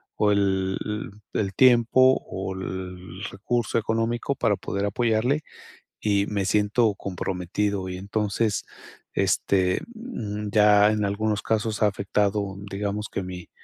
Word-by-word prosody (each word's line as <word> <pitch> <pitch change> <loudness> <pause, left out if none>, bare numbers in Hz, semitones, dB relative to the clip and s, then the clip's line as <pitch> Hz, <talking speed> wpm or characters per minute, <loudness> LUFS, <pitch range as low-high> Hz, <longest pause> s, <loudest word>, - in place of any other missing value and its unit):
o 105 -1 +3
el 95 -1 +1
el 105 0 -4 0.2
el 100 -2 -1
tiempo 130 +1 +5
o 95 0 -4
el 95 0 -6
recurso 115 +4 -1
económico 115 +4 -1
para 115 -5 +2
poder 100 +2 -2
apoyarle, 115 +7 +1 0.6
y 100 -2 +2
me 100 -2 -1
siento 105 +2 +2
comprometido 95 +1 -2
y 90 - -4
entonces, 105 +2 -1 0.5
este, 95 -2 +2
mm, 110 - -5
ya 105 0 +6
en 105 -1 0
algunos 105 +1 0
casos 110 -1 -1
ha 105 - +6
afectado, 100 0 -1
digamos 100 +1 -3
que 95 - -3
mi 90 -1 -8
105 Hz, 130 wpm, -25 LUFS, 95-110 Hz, 0.6 s, ya